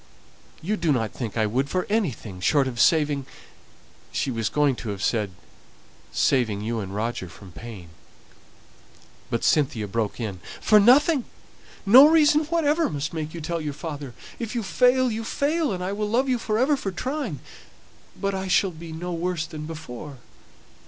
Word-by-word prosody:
You 210 +6 -1
do 170 -4 +1
not 115 -6 0
think 115 -3 -5
I 110 - +2
would 130 +6 0
for 185 +2 -1
anything 140 - -2
short 135 +8 +2
of 120 -3 -5
saving 145 -3 +3 0.4
" - - -29
She 135 - -1
was 115 -3 -1
going 145 -3 +2
to 115 - -6
have 100 -2 -4
said, 105 -4 +1 0.8
"saving 110 -7 +1
you 115 +2 -2
and 100 -1 -5
Roger 110 -3 -3
from 95 0 -13
pain." 100 -4 -10 1.4
But 115 - -2
Cynthia 125 -8 +2
broke 110 +2 -2
in, 105 -6 -4 0.2
"For 215 - +5
nothing. 265 +5 +5 0.6
No 255 +8 +9
reason 310 -1 +4
whatever 325 0 +1
must 150 0 -4
make 155 0 -4
you 170 - -6
tell 170 +1 -3
your 150 -2 -3
father. 145 -4 -7 0.2
If 230 0 -4
you 235 - -1
fail, 250 +4 +3
you 225 +1 -3
fail, 295 +5 0
and 180 -2 -3
I 185 - -2
will 210 0 -2
love 250 +5 +2
you 250 -2 +1
for 215 -1 -1
ever 270 +5 +3
for 205 - -4
trying; 255 - -3 0.8
but 200 0 -1
I 190 0 -3
shall 185 +1 +3
be 165 0 -10
no 175 +3 -5
worse 170 -1 -1
off - - -14
than 150 -1 -6
before. 150 -3 -8
160 Hz, 180 wpm, -24 LUFS, -, 1.4 s, No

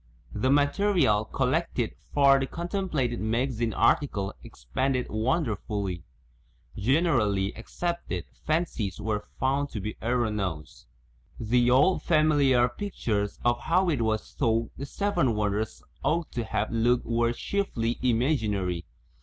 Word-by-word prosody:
The 110 +5 0
material 145 - +3
collected - - -1 0.2
for 140 -1 +5
the 135 - -1
contemplated 170 - -2
magazine 115 +1 0
article 100 -3 +1
expanded 125 - -2
wonderfully. 110 - -1 0.7
Generally 110 - +1
accepted 115 - -4 0.2
fan 160 +3 +2
cies 100 - -5
were 105 -1 -2
found 140 +2 +1
to 110 - -5
be 105 +2 -5
erroneous. 105 - -2 0.5
The 120 +2 +2
old 145 +9 +4
familiar 145 -6 +4
pictures 115 - -3
of 120 0 +3
how 175 +8 +2
it 145 -7 0
was 110 -1 -1
thought 115 -3 0
the 140 - -6
Seven 200 - 0
Won 105 -1 +1
ders 110 +2 -3 0.2
ought 165 +1 0
to 120 -2 -3
have - - -2
looked 120 +2 +2
were 115 0 +1
chiefly 120 - -2
imaginary. 110 - 0
120 Hz, 120 wpm, -27 LUFS, 105-145 Hz, 0.7 s, for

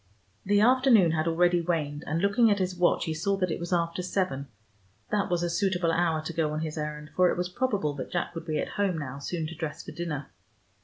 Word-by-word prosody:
The 205 +1 +3
afternoon 245 - +5
had 160 0 0
already 175 +1 +3
waned, 155 -3 -2
and 160 +4 -1
looking 215 +3 +4
at 205 - +3
his 185 -1 -1
watch 180 0 +2
he 160 - -2
saw 195 +5 0
that 185 -3 0
it - - -2
was 170 +1 -5
after 170 0 0
seven. 180 -7 -2 0.6
That 210 -2 +1
was 175 -1 0
a - - +1
suitable 175 -1 +1
hour 165 -2 +1
to 165 - -5
go 155 -2 0
on 155 - -2
his 155 -1 -4
errand, 150 -1 -5
for 180 -1 +5
it - - -1
was 180 0 -1
probable 195 - -1
that 130 - -6
Jack 175 - -2
would 165 0 -7
be 155 -1 -1
at - - -2
home 195 -4 +1
now, 140 -2 -5
soon 165 +3 -3
to 160 - -6
dress 155 -2 -5
for - - -7
dinner. 150 - -5
170 Hz, 240 wpm, -28 LUFS, 155-185 Hz, 0.6 s, afternoon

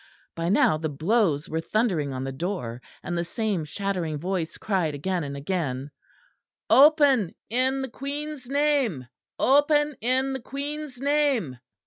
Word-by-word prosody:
By 165 +1 -1
now 155 -6 +4
the 155 0 -2
blows 160 0 +1
were 160 +1 -2
thundering 180 - 0
on 130 0 -4
the 135 - -3
door; 135 - -4 0.2
and 175 - -3
the 170 - 0
same 200 -1 -2
shattering 180 -2 -2
voice 175 0 -3
cried 180 -8 -1
again 175 +4 -2
and 140 -1 -5
again: 140 -4 -3 0.8
"Open 280 - +6 0.2
in 260 +2 +1
the - - -2
Queen's 280 +1 -6
name; 275 - +1 0.3
open 295 +2 +3
in 260 +3 +1
the 265 - -3
Queen's 285 0 -6
name!" 275 - +1
200 Hz, 140 wpm, -26 LUFS, -, 0.8 s, Open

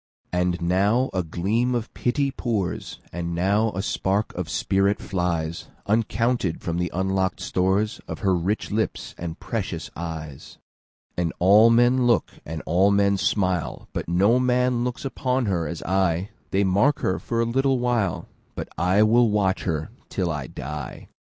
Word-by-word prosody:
And 90 -1 0
now 100 +9 +2
a 95 - +1
gleam 105 +9 0
of 115 -2 -3
pity 140 +3 0
pours, 110 -8 -3 0.2
And 85 0 -3
now 100 +5 +2
a 95 - -3
spark 100 +1 -1
of 90 -3 -4
spirit 95 +6 +1
flies, 85 -3 -2 0.2
Uncounted, 115 -2 +1
from 85 0 -3
the 90 0 0
unlock'd 95 0 0
storesOf 95 +4 -1
her 95 -4 +1
rich 95 +7 -1
lips 110 +2 -2
and 85 -1 -5
precious 95 -7 -4
eyes. 80 -4 -7 0.6
And 85 -2 0
all 105 +5 +6
men 120 +2 +4
look, 120 - +2 0.2
and 80 0 -5
all 95 +4 +3
men 100 0 +3
smile, 95 -3 -1
But - - -4
no 100 +8 +4
man 125 -1 +2
looks 125 +2 -4 0.2
on 130 -1 +2
her 90 -6 0
as 85 +1 -5
I:They 95 +2 0
mark 100 +10 +2
her 95 - 0
for 115 - -2
a 115 - +3
little 135 +3 +2
while, 120 -7 0 0.3
But - - -5
I 95 +4 +4
will 115 +2 +4
watch 100 -2 +1
her 80 0 -2 0.2
till 90 -4 -1
I 75 -4 -4
die. 75 +1 -7
95 Hz, 155 wpm, -24 LUFS, 90-115 Hz, 0.6 s, all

